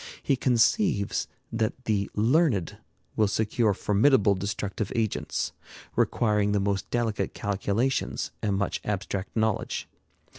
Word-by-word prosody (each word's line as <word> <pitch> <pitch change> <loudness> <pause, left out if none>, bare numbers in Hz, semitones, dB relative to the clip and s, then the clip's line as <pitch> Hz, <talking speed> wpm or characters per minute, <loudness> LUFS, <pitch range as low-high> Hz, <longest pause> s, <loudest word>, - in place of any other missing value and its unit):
He 140 - +2
conceives 125 - +2 0.2
that 115 +3 -2
the 100 -3 0
learned 115 - +2 0.4
will 110 - +3
secure 110 +1 +1
formidable 105 +1 +4
destructive 100 +2 -3
agents, 110 -3 -1 0.4
requiring 105 -3 +2
the 100 - +2
most 100 0 -1
delicate 115 -3 -1
calculations 105 +6 -1
and 100 -3 0
much 100 - -1
abstract 100 -1 -3
knowledge. 110 -2 -1
105 Hz, 110 wpm, -27 LUFS, 100-120 Hz, 0.4 s, formidable